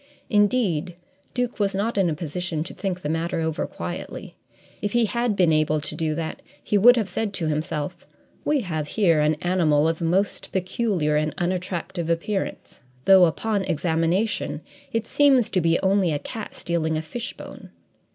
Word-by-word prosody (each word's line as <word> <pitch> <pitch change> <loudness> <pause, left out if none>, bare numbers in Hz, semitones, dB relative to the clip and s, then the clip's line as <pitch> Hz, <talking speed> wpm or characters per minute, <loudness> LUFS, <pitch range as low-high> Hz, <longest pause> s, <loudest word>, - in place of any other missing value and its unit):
Indeed, 205 -6 +2 0.4
Duke 245 -1 -1
was 200 -1 +1
not 215 +4 -1
in 195 -3 +3
a 155 - -1
position 165 0 -3
to 175 - -8
think 185 -2 -3
the 150 - -3
matter 165 +2 -1
over 160 0 -1
quietly. - - -7 0.5
If 205 -1 -2
he 240 -1 +4
had 235 0 0
been 175 -4 +4
able 155 0 +2
to 150 - -4
do 155 -1 -1
that, 160 0 -4 0.2
he - - -1
would 240 +5 +8
have 220 -4 0
said 205 +3 -2
to 170 - -1
himself: 155 +2 -3 0.4
"We 295 -2 +2
have 160 -7 -3
here 170 -4 +3
an 150 +1 +3
animal 160 -4 +3
of 165 +1 -1
most 185 +4 0
peculiar 185 -5 0
and 155 0 -1
unattractive 180 -1 -2
appearance, 190 +4 -2 0.3
though, 190 -2 +8
upon 200 +4 0
examination, 170 +4 0 0.3
it 225 -2 -1
seems 270 -5 +4
to 185 - +2
be 165 0 +2
only 190 -2 +2
a 150 - 0
cat 220 - -7
stealing 160 -2 -1
a 155 - -3
fishbone. 235 +9 -7
180 Hz, 170 wpm, -24 LUFS, 160-205 Hz, 0.5 s, would